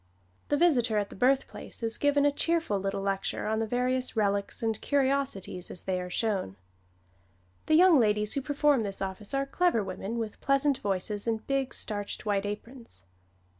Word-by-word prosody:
The 290 - +2
visitor 250 -10 +3
at 205 -1 -1
the - - -9
birthplace 260 +1 0
is 225 0 0
given 285 0 +3
a 290 - +4
cheerful 325 -8 0
little 195 0 -2
lecture 195 -1 -1
on 220 +1 0
the 225 - -1
various 250 +2 0
relics 200 0 0
and 225 -2 -1
curiosities 270 -10 0
as - - -3
they 185 -1 -1
are 180 - -6
shown. 195 - -1 1.1
The 310 - +4
young 350 -3 +7
ladies 210 -2 +2
who 275 - -1
perform 290 -1 +2
this 200 -2 -3
office 195 +5 -4
are 275 0 +1
clever 340 - +1
women 195 +4 -5
with 225 -2 -5
pleasant 275 0 +2
voices 200 +1 -2
and 220 -1 -1
big, 275 -1 0
starched, 205 -1 -3
white 205 -1 0
aprons. 230 - -7
225 Hz, 170 wpm, -29 LUFS, 200-275 Hz, 1.1 s, young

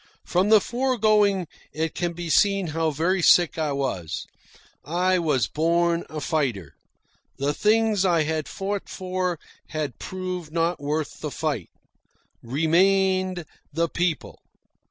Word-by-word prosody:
From 185 +3 +1
the 215 -1 +8
foregoing 215 -6 +2 0.2
it 160 +1 -2
can 175 0 -2
be 170 0 -6
seen 195 +1 +3
how 165 0 +1
very 170 +6 0
sick 170 -2 +5
I 155 -2 0
was. 95 - -3 0.6
I 180 +4 +1
was 145 -9 +1
born 170 +3 +1
a 155 - -5
fighter. 135 - -1 0.6
The 140 +2 0
things 215 +1 +2
I 170 -4 +3
had 155 0 -2
fought 200 +1 -4
for 185 -1 -2 0.3
had 150 -6 -4
proved 185 -4 -5
not 170 +2 0
worth 150 +2 -3
the 150 - -4
fight. 145 - -3 0.7
Remained 185 +6 +2 0.3
the 165 +3 0
PEOPLE. 170 -1 -2
170 Hz, 130 wpm, -24 LUFS, 155-185 Hz, 0.7 s, the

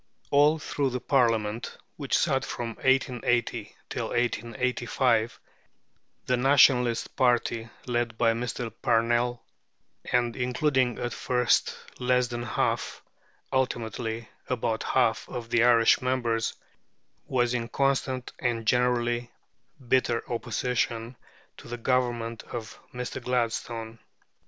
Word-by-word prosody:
All 145 +2 +5
through 145 -2 -1
the 125 0 -3
Parliament, 115 -4 +1 0.2
which - - 0
sat - - +1
from 120 -1 -4
1880 120 -4 0
till - - -3
1885, 120 0 0 0.9
the 125 - +2
Nationalist 125 -2 +4
party, 120 -3 +1 0.2
led 120 -2 -1
by 115 -1 +3
Mr. 120 0 -4
Parnell, 120 0 +1 0.7
and 120 -1 +2
including 125 -1 +1
at 120 - -3
first 125 -1 +1 0.2
less 125 0 +2
than 120 -1 -4
half, 120 - -1 0.5
ultimately 115 -3 -2 0.2
about 115 -3 -1
half, 115 -4 +1
of 115 -1 -6
the 120 -1 +4
Irish 115 -2 +5
members, 120 -3 0 0.7
was 120 -2 +1
in 120 -2 -1
constant 130 0 0
and 115 -2 -1
generally 120 0 +1 0.6
bitter 120 -2 +2
opposition 120 0 -2 0.4
to - - -12
the 120 +1 -5
Government 120 -2 0
of 115 -2 -6
Mr. 125 -1 -5
Gladstone. 115 -2 -2
120 Hz, 110 wpm, -27 LUFS, 115-125 Hz, 0.9 s, All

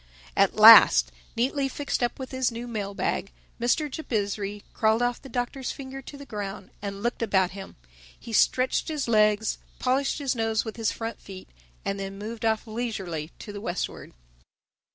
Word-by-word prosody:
At - - +3
last, - - +9 0.2
neatly 270 +3 0
fixed 285 0 -3
up 240 -1 0
with 260 -1 -7
his 260 -2 0
new 235 +1 -6
mail 205 -4 -4
bag, 195 - -2 0.3
Mr. 245 +6 +1
Jabizri 205 -7 -3
crawled 220 +2 +2
off 245 0 -1
the 270 - -11
Doctor's 250 +2 -3
finger 270 -1 -8
to 280 +2 -10
the 280 - -10
ground 205 -4 -6
and 200 0 -5
looked 240 0 -1
about 190 -5 +2
him. 195 0 -9 0.4
He 230 - -9
stretched 255 +4 +2
his 305 -5 -2
legs, 215 -1 +3 0.2
polished 265 +2 +1
his 275 -4 -1
nose 225 -1 0
with 220 - -6
his 225 -2 0
front 225 0 -6
feet 190 -1 -11 0.4
and 195 0 -2
then 195 0 -5
moved 220 +2 -6
off 220 +1 +1
leisurely 200 -9 -4
to 205 - -9
the 205 - -7
westward. 185 -4 -4
225 Hz, 175 wpm, -26 LUFS, 200-255 Hz, 0.4 s, last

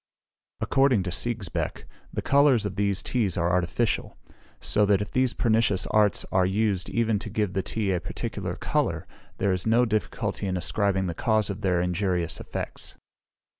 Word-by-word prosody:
According 135 -7 +3
to 90 - -3
Sigesbeck, 110 -4 -2 0.3
the - - -3
colours 140 -6 +4
of 100 -2 -3
these 100 -1 0
teas 110 -8 0
are 85 0 +1
artificial; 90 +6 0 0.4
so 105 - +2
that 100 -1 +4
if 105 - -4
these 130 -1 +1
pernicious 115 -4 +2
arts 105 -2 +3
are 95 - +3
used 100 0 0
even 115 -3 +1
to - - -7
give 105 -4 -1
the 95 - 0
tea 105 0 -2
a 90 - +1
particular - - -4
colour, - - -1 0.3
there 100 - +1
is 90 +3 -2
no 120 +2 +4
difficulty 105 -2 -2
in 95 -1 -1
ascribing 95 +1 +1
the 85 - -2
cause 110 +3 +1
of 100 +2 -7
their 90 -4 +1
injurious 90 -1 -1
effects. - - -6
100 Hz, 170 wpm, -26 LUFS, 95-110 Hz, 0.4 s, colours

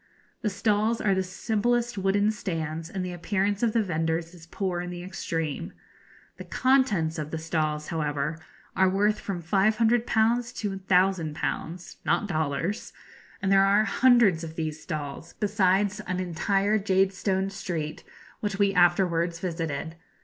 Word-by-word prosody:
The 215 - 0
stalls 210 +3 +1
are 200 -2 +2
the 190 - +1
simplest 230 +5 0
wooden 200 +2 +2
stands, 165 -5 -4
and 185 -1 -3
the 180 - -4
appearance 200 +3 -1
of 230 -2 +2
the 230 - +3
vendors 165 -1 -1
is 165 -2 -14
poor 180 0 -2
in 180 - -5
the 175 0 -6
extreme. 165 -4 -4 0.6
The - - -7
contents 220 -13 +2
of 150 -1 -4
the 160 - -3
stalls, 155 -2 -2
however, 150 -1 -2 0.4
are 190 0 +4
worth 205 +3 +2
from 180 -4 -5
500_l_. 225 +5 +2
to 205 -2 -2
l,000_l_. 180 -2 0
(not - - +1
dollars), 160 +3 -2 0.5
and 195 - +1
there 195 0 +6
are 200 +2 +4
hundreds 230 -8 +4
of 160 -1 -7
these 155 -1 -3
stalls, 155 -1 -6
besides 205 0 +2
an 180 0 -1
entire 195 +4 +1
jadestone 195 0 +1
street 165 -6 -4 0.4
which 205 -2 -2
we 200 -1 +3
afterwards 175 -2 +3
visited. 165 -2 -3
190 Hz, 140 wpm, -27 LUFS, 165-205 Hz, 0.6 s, there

